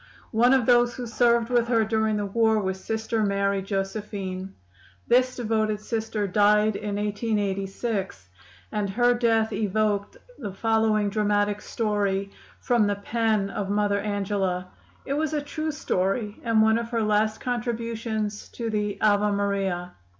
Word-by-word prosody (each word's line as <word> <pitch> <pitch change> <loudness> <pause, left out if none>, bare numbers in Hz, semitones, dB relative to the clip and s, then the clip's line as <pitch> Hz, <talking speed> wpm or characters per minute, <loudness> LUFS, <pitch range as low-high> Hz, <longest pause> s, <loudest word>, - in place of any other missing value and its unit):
One 240 +2 +4
of 255 -3 +2
those 240 0 +4
who 250 - -5
served 235 0 +2
with 240 -1 +3
her 230 -2 +2
during 220 -1 +1
the 205 - -1
war 220 +2 +2
was 190 -2 -2
Sister 220 0 -1
Mary 200 -1 +1
Josephine. 195 -1 -4 0.5
This 255 +1 +3
devoted 215 -3 0
Sister 220 -1 -2
died 210 +2 +3
in 205 -1 -3
1886, 200 - -2 0.4
and 210 -2 -1
her 245 +4 +3
death 225 -2 +1
evoked 210 -1 0 0.2
the 205 -7 -5
following 220 -1 +1
dramatic 205 -1 +1
story 200 -3 -1 0.3
from 235 -4 +2
the 205 - 0
pen 215 -1 0
of 195 -1 -3
Mother 205 0 +1
Angela. 195 -3 -2 0.4
It 275 - -2
was 310 +1 -1
a - - +1
true 310 +2 -3
story, 205 -5 -1
and 225 -2 +3
one 220 +1 +4
of 230 0 -5
her 230 -2 0
last 215 +1 +1
contributions 230 -3 -3
to 230 -2 -3
the 210 -1 -2
"Ave 210 -1 +3
Maria." 195 -3 -1
215 Hz, 145 wpm, -25 LUFS, 200-230 Hz, 0.5 s, One